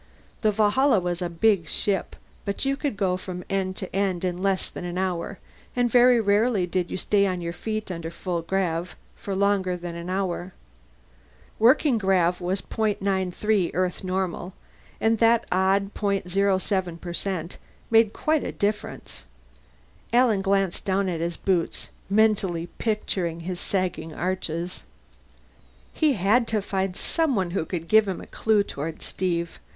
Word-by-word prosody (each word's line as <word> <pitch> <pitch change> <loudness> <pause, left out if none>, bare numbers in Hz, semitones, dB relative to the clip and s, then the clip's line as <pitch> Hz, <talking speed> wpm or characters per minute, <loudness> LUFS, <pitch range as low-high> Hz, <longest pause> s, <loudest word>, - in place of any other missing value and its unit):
The 215 - +3
Valhalla 215 +4 +3
was 175 0 -3
a 175 - -1
big 175 -1 +2
ship, 195 -3 -1 0.3
but 200 +6 -2
you 275 0 +2
could 280 -6 -3
go 185 -2 +1
from 180 -1 -6
end 190 -1 0
to 190 -1 -6
end 190 -2 0
in 180 0 -2
less 195 -1 +1
than - - -8
an 175 0 -4
hour, 185 0 -2 0.4
and 245 -1 +2
very 245 0 +6
rarely 205 -1 +2
did 180 0 -1
you - - -3
stay 200 +1 +2
on 185 -1 -1
your 170 -1 -4
feet 215 +1 -4
under 165 -2 -4
full 170 0 -3
grav 175 -1 -1 0.2
for 195 - -5
long 200 -1 +2
as 180 -1 -3
an 170 0 -5
hour. 185 -1 -2 1.1
Working 250 +2 +5
grav 180 -3 +2
was 185 +2 -1
.93 200 -2 0
Earth 185 0 -1
normal, 185 -1 -2 0.5
and 225 0 +2
that 230 0 +4
odd 195 +2 +2
.07% 190 -3 -1 0.3
made 225 -2 +5
quite 310 +4 0
a - - -3
difference. 205 - -3 0.9
Alan 235 -4 +4
glanced 195 -2 +1
down 195 0 +1
at 170 -2 -2
his 170 0 -2
boots, 180 -4 -1 0.2
mentally 200 -5 +2
picturing 185 -6 -1
his 175 +1 -4
sagging 180 -4 -2
arches. 175 -1 -3 1.1
He 305 -2 +3
had 225 +4 +3
to 220 -1 +1
find 190 -2 -1
someone 250 - 0
who 175 -3 -1
could 165 -3 -4
give 220 +1 +5
him 190 - -2
a - - -9
clue 215 -2 +2
toward 160 -3 -6
Steve. 170 -2 -2
190 Hz, 150 wpm, -25 LUFS, 175-210 Hz, 1.1 s, very